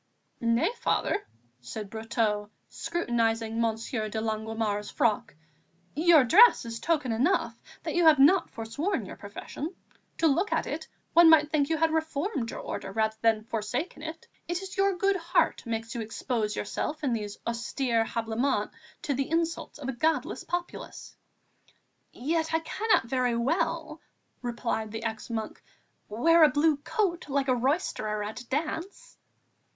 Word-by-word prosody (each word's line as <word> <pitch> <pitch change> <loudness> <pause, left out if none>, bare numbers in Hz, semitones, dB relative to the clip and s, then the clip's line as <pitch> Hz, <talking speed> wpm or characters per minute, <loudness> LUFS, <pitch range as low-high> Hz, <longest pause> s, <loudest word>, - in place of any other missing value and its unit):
"Nay, 235 - +2
Father," - - 0 0.3
said 195 - -7
Brotteaux, 220 -2 -1 0.2
scrutinizing 230 -8 -1
Monsieur 225 0 -1
de 220 - -3
Longuemare's 220 -1 -2
frock, 235 - 0 0.6
"your 320 -1 +6
dress 385 - +7
is 230 0 -5
token 300 -6 0
enough 260 +12 +1 0.3
that - - -3
you 345 - +2
have 310 -1 +8
not 320 +7 +5
forsworn 230 - -3
your - - -8
profession; 280 - -7 0.4
to - - +1
look 330 +7 +2
at - - +1
it, - - -5 0.3
one 340 -1 +8
might 305 -1 +6
think 290 -2 +2
you 325 - +1
had 325 +1 +2
reformed 315 - -1
your - - -6
Order 195 - -5
rather 220 +1 0
than 225 -1 +3
forsaken 225 - -3
it. 320 +1 -7 0.2
It 350 +2 -2
is 380 - -8
your 390 -1 +2
good 390 +2 +2
heart 340 -7 +1
makes 225 +1 -3
you 235 - -3
expose 220 -1 -2
yourself 300 +8 -3
in 265 -4 +1
these 210 -3 -4
austere 235 0 0
habiliments 225 0 -1 0.3
to 285 - 0
the 270 +1 -2
insults 330 0 -1
of 285 -3 -7
a - - 0
godless 315 +7 0
populace." 350 0 -5 1.0
"Yet 320 +4 -1
I - - +3
cannot 435 - +1
very 250 -1 0
well," 320 +4 -1 0.4
replied 235 -3 -2
the 225 +1 -5
ex 220 -1 -4
monk, 220 -2 -4 0.5
"wear 325 +10 +5
a 305 - +8
blue 300 0 +3
coat, 345 +1 -1
like 275 -1 0
a 255 - +4
roisterer 235 - -1
at 215 +4 -6
a 245 - -15
dance!" 320 +7 -4
260 Hz, 155 wpm, -28 LUFS, 225-325 Hz, 1.0 s, have